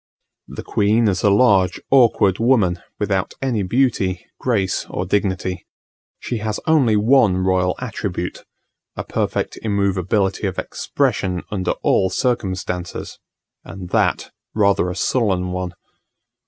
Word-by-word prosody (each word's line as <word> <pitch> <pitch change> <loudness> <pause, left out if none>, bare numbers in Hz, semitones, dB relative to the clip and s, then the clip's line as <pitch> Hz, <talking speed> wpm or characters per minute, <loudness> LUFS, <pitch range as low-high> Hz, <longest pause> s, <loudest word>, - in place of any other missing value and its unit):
The - - -8
queen 110 +3 +2
is 95 -3 0
a 105 - +4
large 100 -4 +3
awkward 115 -7 +4
woman, 110 -8 +2 0.2
without 100 -3 -1
any 125 -6 -1
beauty, 95 -4 0
grace 105 -7 0
or 90 - -3
dignity. 95 -2 -1 0.5
She 120 - -4
has 110 0 -3
only 140 -9 +3
one 110 -3 +4
royal 95 -1 +1
attribute: 100 -7 -4 0.5
a - - -4
perfect - - -2
immovability 100 -2 0
of - - -5
expression 90 -2 -1
under 95 -4 -1
all 95 - +3
circumstances, 95 -6 -3 0.4
and 90 -2 -9
that - - +1 0.2
rather 100 -4 +2
a 90 - -4
sullen 95 -5 0
one. 90 -1 -4
100 Hz, 120 wpm, -20 LUFS, 90-110 Hz, 0.5 s, a